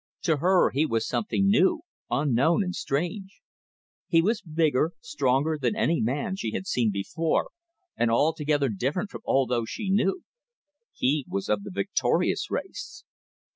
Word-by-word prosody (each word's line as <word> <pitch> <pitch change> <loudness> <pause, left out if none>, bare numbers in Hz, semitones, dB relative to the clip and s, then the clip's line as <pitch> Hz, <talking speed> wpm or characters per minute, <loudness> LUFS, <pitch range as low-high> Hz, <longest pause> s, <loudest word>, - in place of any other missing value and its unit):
To 160 -4 +2
her 180 +5 +3
he 150 +4 +1
was 115 -1 -1
something 195 -2 0
new, 315 - +3 0.3
unknown 140 - +2
and 180 -1 -3
strange. 180 +8 -3 0.7
He 165 - +4
was 215 +4 +1
bigger, 160 -1 +1
stronger 150 0 0
than 210 - +1
any 170 -6 +1
man 140 +11 -1
she 110 - -3
had - - -3
seen 120 - +1
before, 155 +12 -1 0.4
and 120 - +1
altogether 145 +2 +2
different 140 - -2
from - - -8
all 135 0 +3
those 120 -2 -1
she 200 -4 -3
knew. 200 - +1 0.7
He 140 +3 0
was 100 - -3
of 105 -1 +1
the - - -8
victorious 100 +2 0
race. 235 - -5
155 Hz, 150 wpm, -26 LUFS, 125-185 Hz, 0.7 s, He